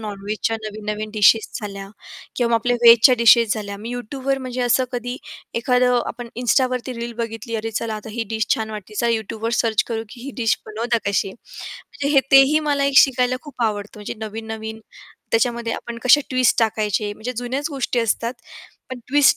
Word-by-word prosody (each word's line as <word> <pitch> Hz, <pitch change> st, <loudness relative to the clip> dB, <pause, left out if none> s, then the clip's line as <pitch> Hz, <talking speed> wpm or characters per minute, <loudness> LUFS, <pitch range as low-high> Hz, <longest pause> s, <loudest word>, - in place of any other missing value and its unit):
नॉन-व्हेजच्या 210 Hz, +1 st, -3 dB
नवीन-नवीन 215 Hz, 0 st, -5 dB
डिशेस 215 Hz, +1 st, +4 dB
झाल्या 200 Hz, -1 st, -7 dB, 0.5 s
किंवा 240 Hz, -2 st, +1 dB
मग 230 Hz, -, +3 dB
आपल्या 245 Hz, +2 st, 0 dB
व्हेजच्या 235 Hz, +2 st, +8 dB
डिशेस 230 Hz, -1 st, +6 dB
झाल्या 200 Hz, -2 st, -5 dB
मी 230 Hz, +3 st, -6 dB
Youtubeवर 265 Hz, +3 st, -3 dB
म्हणजे 255 Hz, -1 st, -5 dB
असं 245 Hz, +2 st, +3 dB
कधी 245 Hz, +1 st, -4 dB, 0.4 s
एखादं 250 Hz, 0 st, +2 dB
आपण 240 Hz, -1 st, -6 dB
Instaवरती 255 Hz, +1 st, +1 dB
रील 235 Hz, 0 st, -4 dB
बघितली 230 Hz, 0 st, -5 dB
अरे 225 Hz, +1 st, -4 dB
चला 225 Hz, +1 st, -3 dB
आता 215 Hz, +1 st, -8 dB
ही 230 Hz, +1 st, -3 dB
डिश 220 Hz, -1 st, 0 dB
छान 220 Hz, -1 st, -4 dB
वाटते 210 Hz, -1 st, -8 dB
चला 235 Hz, +2 st, +1 dB
Youtubeवर 225 Hz, 0 st, -3 dB
सर्च 220 Hz, -2 st, +2 dB
करू 225 Hz, -1 st, -3 dB
की 240 Hz, -, -12 dB
ही 280 Hz, -, -5 dB
डिश 230 Hz, -3 st, +1 dB
बनवतात 230 Hz, +2 st, -1 dB
कशी? 195 Hz, -1 st, 0 dB
म्हणजे 280 Hz, +6 st, -8 dB
हे 275 Hz, -, +7 dB
तेही 270 Hz, +3 st, +7 dB
मला 280 Hz, -1 st, +1 dB
एक 275 Hz, 0 st, +5 dB
शिकायला 255 Hz, -1 st, +4 dB
खूप 275 Hz, -5 st, -7 dB
आवडतं 210 Hz, -1 st, -2 dB
म्हणजे 205 Hz, -, -5 dB
नवीन-नवीन 220 Hz, 0 st, -7 dB, 0.5 s
त्याच्यामध्ये 235 Hz, 0 st, +1 dB
आपण 235 Hz, -1 st, -6 dB
कशा 270 Hz, +4 st, +6 dB
ट्विस्ट 255 Hz, -2 st, +2 dB
टाकायचे 210 Hz, -2 st, 0 dB
म्हणजे 240 Hz, +4 st, -5 dB
जुन्याच 260 Hz, +6 st, -3 dB
गोष्टी 265 Hz, -3 st, -2 dB
असतात 230 Hz, +1 st, -1 dB, 0.6 s
पण 255 Hz, -, -5 dB
ट्विस्ट 285 Hz, +1 st, +5 dB
230 Hz, 175 wpm, -21 LUFS, 215-250 Hz, 0.6 s, व्हेजच्या